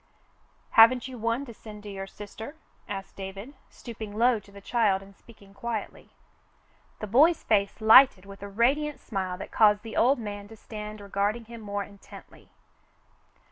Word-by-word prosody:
"Haven't 235 Hz, +3 st, +6 dB
you 255 Hz, -2 st, -9 dB
one 230 Hz, +5 st, -1 dB
to 235 Hz, -, -10 dB
send 210 Hz, -1 st, -12 dB
to 210 Hz, -, -8 dB
your 195 Hz, -1 st, -6 dB
sister? 215 Hz, +8 st, -9 dB, 0.2 s
" -, -, -33 dB
asked 195 Hz, -1 st, -6 dB
David, 195 Hz, +7 st, -8 dB, 0.2 s
stooping 220 Hz, -3 st, -9 dB
low 240 Hz, 0 st, +3 dB
to 200 Hz, 0 st, -19 dB
the 200 Hz, -, -12 dB
child 200 Hz, -2 st, +1 dB
and 195 Hz, 0 st, -16 dB
speaking 200 Hz, -3 st, -18 dB
quietly. 220 Hz, +1 st, -5 dB, 0.9 s
The -, -, -2 dB
boy's 295 Hz, -, +4 dB
face 200 Hz, -2 st, +1 dB
lighted 220 Hz, -3 st, +7 dB
with 195 Hz, 0 st, -12 dB
a 200 Hz, -, -7 dB
radiant 275 Hz, +8 st, +1 dB
smile 185 Hz, -3 st, -4 dB
that -, -, -8 dB
caused 210 Hz, -1 st, +4 dB
the 225 Hz, -, -8 dB
old 260 Hz, +4 st, +4 dB
man 205 Hz, -3 st, -6 dB
to 225 Hz, +1 st, -13 dB
stand 210 Hz, -1 st, -8 dB
regarding 205 Hz, +3 st, -2 dB
him 230 Hz, 0 st, -10 dB
more 205 Hz, -1 st, -3 dB
intently. 200 Hz, 0 st, -15 dB
215 Hz, 170 wpm, -27 LUFS, 200-235 Hz, 0.9 s, lighted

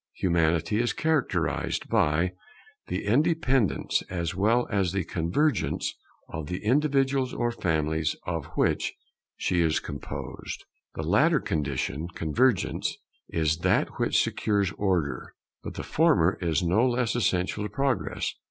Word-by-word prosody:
Humanity 85 Hz, +2 st, +1 dB
is 120 Hz, -, 0 dB
characterized 155 Hz, -5 st, 0 dB
by 80 Hz, +5 st, +2 dB, 0.6 s
the -, -, -3 dB
independence 130 Hz, -, +2 dB
as 85 Hz, -2 st, -2 dB
well 110 Hz, +6 st, +2 dB
as 95 Hz, -4 st, +1 dB
by -, -, -2 dB
the 95 Hz, -, +1 dB
convergence 90 Hz, -, 0 dB, 0.3 s
of 80 Hz, -2 st, -6 dB
the 90 Hz, +3 st, -5 dB
individuals 135 Hz, 0 st, +2 dB
or 120 Hz, 0 st, 0 dB
families 80 Hz, -5 st, 0 dB
of 85 Hz, -4 st, -3 dB
which -, -, +1 dB, 0.4 s
she 90 Hz, -1 st, +1 dB
is 80 Hz, -2 st, +2 dB
composed. -, -, -7 dB, 0.3 s
The -, -, -3 dB
latter -, -, +4 dB
condition, 70 Hz, +1 st, -2 dB
convergence, 115 Hz, -, +1 dB, 0.3 s
is 80 Hz, -1 st, +1 dB
that -, -, +1 dB
which -, -, +3 dB
secures 100 Hz, -3 st, 0 dB
Order; 85 Hz, -11 st, -1 dB, 0.3 s
but -, -, -7 dB
the -, -, -4 dB
former 100 Hz, -, +3 dB
is 85 Hz, -3 st, +1 dB
no 90 Hz, +7 st, +3 dB
less 120 Hz, -3 st, 0 dB
essential 100 Hz, -2 st, 0 dB
to 105 Hz, -, -3 dB
Progress. 125 Hz, -, -1 dB
95 Hz, 130 wpm, -27 LUFS, 80-120 Hz, 0.6 s, latter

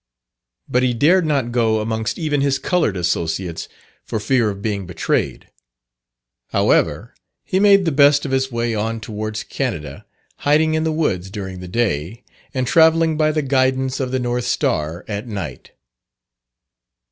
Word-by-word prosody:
But 125 Hz, -, +1 dB
he 125 Hz, -1 st, +1 dB
dared 165 Hz, +7 st, +4 dB
not 135 Hz, -6 st, 0 dB
go 115 Hz, -2 st, +2 dB
amongst 110 Hz, 0 st, -2 dB
even 150 Hz, -3 st, 0 dB
his 140 Hz, -1 st, +2 dB
coloured 160 Hz, -, 0 dB
associates 85 Hz, 0 st, -2 dB, 0.3 s
for 110 Hz, -, -3 dB
fear 115 Hz, +1 st, +2 dB
of 100 Hz, -1 st, -5 dB
being 100 Hz, -4 st, -2 dB
betrayed. 90 Hz, -, -2 dB, 1.0 s
However, -, -, +1 dB, 0.3 s
he 190 Hz, -, 0 dB
made 200 Hz, -1 st, +5 dB
the 165 Hz, -, +1 dB
best 145 Hz, 0 st, +4 dB
of 135 Hz, -, -3 dB
his 135 Hz, 0 st, 0 dB
way 115 Hz, 0 st, -1 dB
on 110 Hz, +1 st, -2 dB
towards 110 Hz, 0 st, -5 dB
Canada, 75 Hz, -, -4 dB, 0.3 s
hiding 155 Hz, +2 st, +2 dB
in 160 Hz, 0 st, 0 dB
the 160 Hz, -, +1 dB
woods 95 Hz, -, -1 dB
during 95 Hz, -2 st, -6 dB
the 90 Hz, -, -8 dB
day, 100 Hz, -, -2 dB, 0.3 s
and 130 Hz, -2 st, -1 dB
travelling 160 Hz, +3 st, +4 dB
by 155 Hz, 0 st, +2 dB
the 155 Hz, -1 st, -1 dB
guidance 130 Hz, -1 st, +1 dB
of 130 Hz, -2 st, -1 dB
the 130 Hz, -, -1 dB
North 120 Hz, -1 st, -2 dB
Star 80 Hz, -6 st, -1 dB
at 105 Hz, +2 st, -4 dB
night. 95 Hz, -, -6 dB
120 Hz, 155 wpm, -20 LUFS, 105-145 Hz, 1.0 s, made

